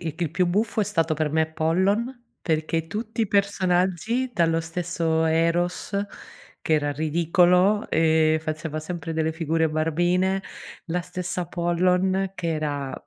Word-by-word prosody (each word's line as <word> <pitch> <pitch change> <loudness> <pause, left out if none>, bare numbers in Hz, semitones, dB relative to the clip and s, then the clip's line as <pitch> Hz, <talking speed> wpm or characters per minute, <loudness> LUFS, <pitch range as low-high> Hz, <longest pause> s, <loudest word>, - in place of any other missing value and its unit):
il 160 -3 -4
il 165 -4 -1
più 180 0 +2
buffo 215 +5 0
è - - +2
stato 165 -5 0
per 150 -1 -1
me 160 0 +2
Pollon, 200 +10 0
perché 160 0 -1
tutti 220 +4 -4
i 220 - +1
personaggi, 200 +4 +1
dallo 165 -3 +2
stesso 165 -1 -1
Eros, 165 +4 0 0.7
che 160 - -1
era 145 -1 +1
ridicolo, 175 +6 +2
ehm, 160 -1 +3
faceva 155 0 -4
sempre 165 0 -5
delle 160 0 0
figure 160 0 0
barbine. 175 +5 +1 0.4
La 175 +2 -1
stessa 180 0 -4
Pollon, 180 +3 +1
che 170 -3 -3
era 145 -3 -3
170 Hz, 140 wpm, -24 LUFS, 160-185 Hz, 0.7 s, ehm